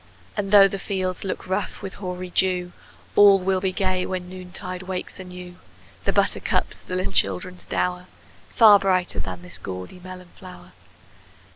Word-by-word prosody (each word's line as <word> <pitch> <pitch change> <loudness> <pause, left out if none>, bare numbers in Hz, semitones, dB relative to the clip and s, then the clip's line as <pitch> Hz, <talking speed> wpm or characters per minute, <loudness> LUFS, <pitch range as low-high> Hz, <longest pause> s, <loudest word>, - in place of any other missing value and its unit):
And 205 -2 -2
though 200 -1 +8
the 195 0 -5
fields 185 -2 -3
look 190 - -4
rough 190 +2 -3
with 195 - -5
hoary 180 -1 -6
dew, 180 -1 +1 0.4
All 205 -1 +8
will 190 0 0
be 190 -1 0
gay 185 -1 0
when 185 -1 -4
noontide 185 0 -6
wakes 185 0 -6
anew 180 -1 -9 0.5
The - - +3
buttercups, - - 0
the 185 - -5
little 185 - -2
children's 100 - -1
dower 180 0 -1 0.4
Far 210 -3 +7
brighter 185 -2 0
than 90 -2 -5
this 90 +1 -8
gaudy 90 - -7
melon 185 0 -10
flower! 185 -1 -12
185 Hz, 155 wpm, -24 LUFS, 180-190 Hz, 0.5 s, though